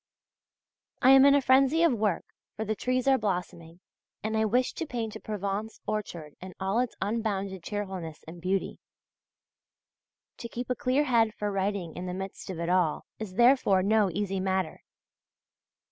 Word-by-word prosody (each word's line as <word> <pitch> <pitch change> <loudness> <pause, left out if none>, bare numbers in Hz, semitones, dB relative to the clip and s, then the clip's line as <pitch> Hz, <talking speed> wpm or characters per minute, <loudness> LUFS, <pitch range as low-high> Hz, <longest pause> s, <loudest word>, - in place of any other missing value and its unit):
I 260 - +8
am 270 0 +8
in 280 0 +7
a 285 - +3
frenzy 270 +5 +4
of 335 - +4
work, 210 -6 0 0.3
for 220 - -3
the 215 +1 -1
trees 255 +3 -1
are 265 -1 +5
blossoming, 180 -4 -4 0.4
and 215 +1 -1
I 220 0 +2
wished 245 +4 +1
to 330 - -3
paint 230 -5 -4
a - - -6
Provence 210 +1 -4
orchard 175 -8 -4
in 185 0 -9
all 195 +4 0
its 250 -2 -1
unbounded 200 -3 -2
cheerfulness 190 -5 -5
and 170 +1 -10
beauty. 190 +2 -1 1.6
To 235 - -7
keep 245 +2 -5
a - - +1
clear 270 +2 +1
head 230 -5 +2
for 210 0 -2
writing 195 -4 -2
in 180 +1 -5
the 180 - -4
midst 190 +1 -7
of 180 -3 -5
it 170 - -2
all, 175 -3 +1
is 205 -4 -6
therefore 235 -6 +4
no 210 0 +3
easy 195 +2 -2
matter. 190 -3 -1
205 Hz, 170 wpm, -28 LUFS, 185-240 Hz, 1.6 s, I